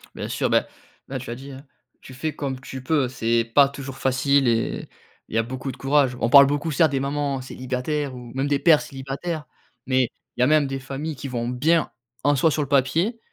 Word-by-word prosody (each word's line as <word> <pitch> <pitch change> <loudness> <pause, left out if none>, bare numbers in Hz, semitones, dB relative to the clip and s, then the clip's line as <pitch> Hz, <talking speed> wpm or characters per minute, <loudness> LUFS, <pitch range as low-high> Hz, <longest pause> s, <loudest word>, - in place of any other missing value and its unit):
Bien - - -4
sûr, - - -1
bah, - - +2 0.4
là, 135 -1 -4
tu 120 - -9
l'as 120 - -3
dit, 135 +2 -10
hein. 135 +2 -11 0.4
Tu 130 - -12
fais 150 +4 -4
comme 135 -3 -4
tu 130 0 -8
peux. 140 -2 +2
C'est 115 -2 0
pas 135 +4 +4
toujours 135 -1 -8
facile 135 +1 +2
et 115 -1 0 0.4
il - - -6
y - - +3
a 115 - +3
beaucoup 130 +3 -5
de 125 - -12
courage. 135 -2 +2
On 115 - +1
parle 140 0 +9
beaucoup, 145 +3 -1
certes, 155 +2 +3
des 135 - 0
mamans 140 -1 -1
célibataires 130 +3 -3
ou 120 -1 -10
même 135 +2 -1
des 140 -1 +1
pères 160 -3 +5
célibataires, 140 +4 -5 0.4
mais 130 -1 +3 0.3
il - - -2
y - - +6
a - - +4
même 150 -2 +4
des 135 0 -4
familles 140 +4 -5
qui 140 - -6
vont 120 -2 -3
bien, 155 +7 +1 0.3
en 145 0 +4
soi, 160 +4 +3
sur 150 - 0
le 140 - -2
papier, 165 - +1
135 Hz, 230 wpm, -23 LUFS, 130-145 Hz, 0.4 s, parle